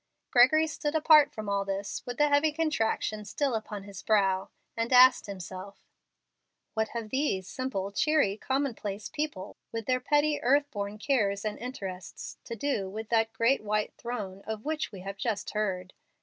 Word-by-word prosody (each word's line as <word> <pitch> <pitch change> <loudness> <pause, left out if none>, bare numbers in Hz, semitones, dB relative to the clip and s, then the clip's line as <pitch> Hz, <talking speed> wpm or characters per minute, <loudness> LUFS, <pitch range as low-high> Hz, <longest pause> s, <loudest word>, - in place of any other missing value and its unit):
Gregory 290 +6 +6
stood 300 -1 -3
apart 305 -2 +6
from 215 -6 -7
all 200 0 +1
this, 195 0 -4
with 245 - -4
the 295 - +4
heavy 290 +2 +3
contraction 225 -9 -1
still 275 +5 -1
upon 215 -2 -4
his 200 -2 -9
brow, 195 -3 +2 0.3
and 230 +1 -2
asked 255 -1 +7
himself, 190 0 -8 0.9
"What 220 -1 0
have 225 -2 -6
these 260 -9 0
simple, 200 -4 -3
cheery, 290 -3 +2
commonplace 220 -6 -2
people, 295 -11 -4
with 225 -1 -4
their 255 -1 +2
petty 295 +3 +2
earth 285 +3 +3
born 205 0 -4
cares 215 -5 0
and 215 - -3
interests, 195 -8 -7
to 230 - -5
do 225 -6 -1
with 215 +2 -6
that 225 -1 +2
'great 235 +5 +2
white 210 0 -1
throne' 205 -6 -5
of 220 +1 -5
which 310 0 -2
we 190 - -9
have 195 +1 -6
just 215 0 -2
heard? 190 -4 -2
220 Hz, 165 wpm, -29 LUFS, 200-275 Hz, 0.9 s, asked